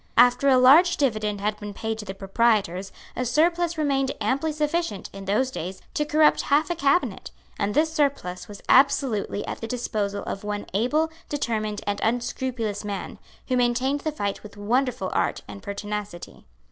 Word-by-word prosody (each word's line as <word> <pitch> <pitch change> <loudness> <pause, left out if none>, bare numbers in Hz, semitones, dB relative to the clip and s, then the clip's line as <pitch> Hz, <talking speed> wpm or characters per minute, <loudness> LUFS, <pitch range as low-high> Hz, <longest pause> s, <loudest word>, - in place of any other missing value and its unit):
After 245 +3 +5
a 260 - +6
large 300 +8 +6
dividend 215 -7 0
had 210 +1 -1
been 205 -1 -7
paid 220 0 -3
to 210 - -6
the 190 -1 -6
proprietors, 195 -2 +1 0.2
a 250 - -1
surplus 335 +6 +1
remained 275 -3 +1
amply 265 +9 0
sufficient, 300 - -2
in 195 0 -8
those 235 +7 +1
days, 185 -3 -5
to 300 - 0
corrupt 300 +1 +4
half 290 +3 +2
a - - 0
cabinet; 285 +2 +1 0.3
and 205 0 -1
this 315 +2 +2
surplus 270 - -1
was 205 -1 -11
absolutely 265 -7 +3
at - - -6
the 225 - -4
disposal 215 -4 -2
of 195 - -5
one 205 0 -3
able, 295 +10 +1 0.2
determined 215 -7 -2
and 205 0 -1
unscrupulous 235 -2 -2
man, 200 -2 -5 0.3
who 255 - +1
maintained 250 +3 +1
the 310 - -2
fight 205 -9 -3
with 210 -1 -12
wonderful 235 -1 0
art - - 0
and 100 -1 -9
pertinacity. 205 -2 -6
235 Hz, 170 wpm, -25 LUFS, 205-280 Hz, 0.3 s, a